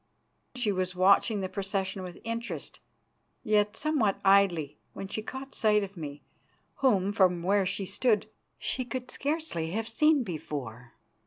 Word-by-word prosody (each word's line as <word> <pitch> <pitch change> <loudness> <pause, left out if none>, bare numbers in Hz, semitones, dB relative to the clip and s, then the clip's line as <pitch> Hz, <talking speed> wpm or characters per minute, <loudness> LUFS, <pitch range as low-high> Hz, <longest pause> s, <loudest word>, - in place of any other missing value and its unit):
She 245 -5 0
was 185 -1 -2
watching 200 +3 +4
the 190 - -1
procession 195 0 -3
with 180 -2 -8
interest, 230 +1 -5 0.6
yet 210 0 +2
somewhat 280 -10 +1
idly, 175 -7 +3
when 195 - -6
she 215 - -3
caught 265 +4 -7
sight 210 -1 +3
of 200 0 -7
me, 150 -4 -7 0.5
whom, 205 -8 +3
from 180 -4 +3
where 195 +1 +2
she 200 +1 -1
stood, 210 +2 +1 0.3
she 255 - -2
could 250 +1 -5
scarcely 285 - -2
have 225 +1 -2
seen 300 +4 +3
before. 130 - -6
200 Hz, 145 wpm, -29 LUFS, 185-230 Hz, 0.6 s, watching